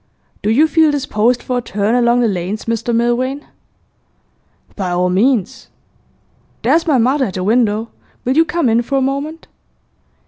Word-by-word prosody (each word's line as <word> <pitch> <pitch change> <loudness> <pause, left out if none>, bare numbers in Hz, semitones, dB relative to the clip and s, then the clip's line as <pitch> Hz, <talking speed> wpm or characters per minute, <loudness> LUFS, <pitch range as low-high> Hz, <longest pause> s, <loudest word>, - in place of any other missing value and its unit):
'Do 210 - -1
you 285 +9 +4
feel 320 -1 +3
disposed 250 -4 0
for 250 -1 -1
a - - -5
turn 210 -1 -1
along 240 0 +3
the 235 - +2
lanes, 195 +1 -3
Mr 230 +1 -2
Milvain?' 240 +4 0 1.3
'By 190 -3 -3
all 180 +1 0
means. 235 +4 0 1.0
There's 330 +1 +2
my 290 -4 +3
mother 260 +4 +2
at 195 - -6
the 185 - -3
window; 220 +1 +1 0.4
will 255 +2 0
you 325 - +5
come 335 -3 -1
in 230 +1 +3
for 275 +3 -2
a - - +1
moment? 280 +4 -3
240 Hz, 165 wpm, -16 LUFS, 215-275 Hz, 1.3 s, you